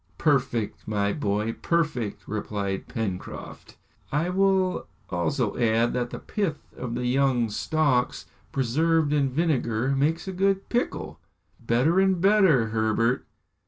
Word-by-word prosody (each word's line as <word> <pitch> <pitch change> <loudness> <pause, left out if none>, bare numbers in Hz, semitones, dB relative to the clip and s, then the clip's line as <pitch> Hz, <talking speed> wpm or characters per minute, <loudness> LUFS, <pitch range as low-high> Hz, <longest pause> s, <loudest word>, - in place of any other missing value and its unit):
"Perfect, 125 -7 0
my 100 -1 0
boy, 105 -4 -1
perfect!" 150 -11 -1
replied 100 -2 -3
Pencroft. 105 -7 -6 0.3
"I 150 +5 0
will 190 -1 +2 0.2
also 105 - 0
add 115 0 +2
that 120 -1 -1
the - - -6
pith 195 -8 -4
of 120 -2 -5
the 125 +1 -2
young 125 -3 +2
stalks, 140 0 0 0.3
preserved 150 +4 +1
in 140 -2 +2
vinegar, 130 -5 0
makes 155 +6 0
a 190 - -3
good 195 +1 +1
pickle." 245 +2 -2 0.4
"Better 125 +10 +2
and 190 -2 +3
better, 185 - +4
Herbert!" 110 +2 +1
130 Hz, 125 wpm, -26 LUFS, 115-165 Hz, 0.4 s, better